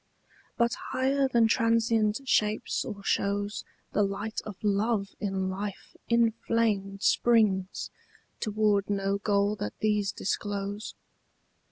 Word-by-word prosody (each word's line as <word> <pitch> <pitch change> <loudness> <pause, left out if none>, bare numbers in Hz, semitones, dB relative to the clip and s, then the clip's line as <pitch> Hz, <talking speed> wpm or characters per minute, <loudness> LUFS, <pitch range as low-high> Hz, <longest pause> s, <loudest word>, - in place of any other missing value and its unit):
But 235 0 +2 0.2
higher 270 +1 +2
than 235 -3 +4
transient 230 0 +2
shapes 215 -3 +1
or 200 -1 -7
shows 205 +1 -1 0.3
The - - +1
light 200 +2 -2
of 210 - -6
love 205 0 +1
in 195 -2 -1
life 200 +1 -6
inflamed 225 -4 +1
Springs, 210 -5 +2 0.5
toward 210 -2 +1
no 200 0 0
goal 205 0 +1
that 105 - -5
these 210 -2 +1
disclose. 205 +1 -3
210 Hz, 110 wpm, -28 LUFS, 200-225 Hz, 0.5 s, than